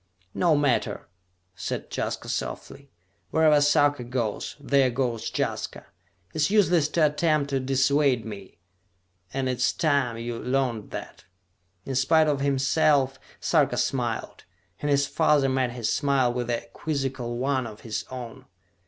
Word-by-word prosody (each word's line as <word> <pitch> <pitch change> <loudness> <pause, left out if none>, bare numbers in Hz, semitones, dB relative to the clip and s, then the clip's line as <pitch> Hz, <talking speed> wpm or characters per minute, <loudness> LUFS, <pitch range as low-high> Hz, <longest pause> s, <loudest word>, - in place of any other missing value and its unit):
"No 170 -4 +3
matter," 145 -4 0 0.5
said 90 - -5
Jaska - - -3
softly, 140 0 -5 0.4
"wherever 155 -2 +4
Sarka 145 -2 +3
goes, 120 -3 -3
there 140 -2 +3
goes 120 -2 -2
Jaska! - - -3 0.5
It - - -28
is 150 -1 +2
useless 180 -7 +3
to 160 -1 +3
attempt 150 -1 +1
to 135 - +1
dissuade 135 -1 +2
me, 100 -3 -9 0.7
and 135 -1 -2
it 125 -1 -1
is 130 +1 +2
time 140 -7 +1
you 115 0 -4
learned 125 -5 -1
that!" - - -8 0.6
In 135 - -4
spite 155 +5 +4
of 145 -2 +1
himself 140 0 +2 0.2
Sarka - - +2
smiled, - - -2 0.3
and 145 - -2
his 140 0 +3
father 140 0 +2
met 130 -1 +1
his 115 -3 -1
smile 135 -4 +2
with 125 -1 -3
a 120 - -2
quizzical 135 -5 -3
one 130 -1 0
of 105 -2 -11
his 110 -2 -4
own. 125 -3 -8
135 Hz, 145 wpm, -26 LUFS, 125-145 Hz, 0.7 s, wherever